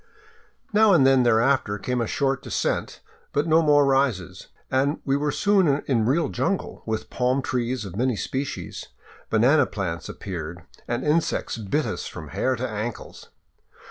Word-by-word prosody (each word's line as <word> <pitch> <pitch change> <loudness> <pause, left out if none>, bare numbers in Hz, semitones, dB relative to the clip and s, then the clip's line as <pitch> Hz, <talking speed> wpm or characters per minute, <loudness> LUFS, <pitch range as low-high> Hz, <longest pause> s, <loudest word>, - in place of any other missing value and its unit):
Now 215 -1 +5
and 150 -7 +5
then 135 -1 +5
thereafter 120 -2 +2
came 125 +4 -2
a 115 - -1
short 135 +1 0
descent, - - -2 0.3
but 145 - +1
no 165 0 +4
more 145 -2 +4
rises, 135 -10 0 0.2
and 140 +3 +1
we 135 - +2
were 145 +1 0
soon 185 -9 +2
in 115 -5 +1
real 145 +2 +2
jungle, 155 +10 -2
with 110 0 -3
palm 130 +2 0
trees 125 -2 -2
of 95 -2 -8
many 125 +2 +1
species. 135 +6 -4 0.4
Banana 130 +6 +4
plants 90 -5 -4
appeared; 85 -2 -6 0.2
and 120 +1 -2
insects 155 -5 0
bit 125 +9 -1
us - - -4
from - - -9
hair 130 - 0
to 130 +2 -3
ankles. 110 +1 -6
130 Hz, 155 wpm, -24 LUFS, 115-145 Hz, 0.4 s, Now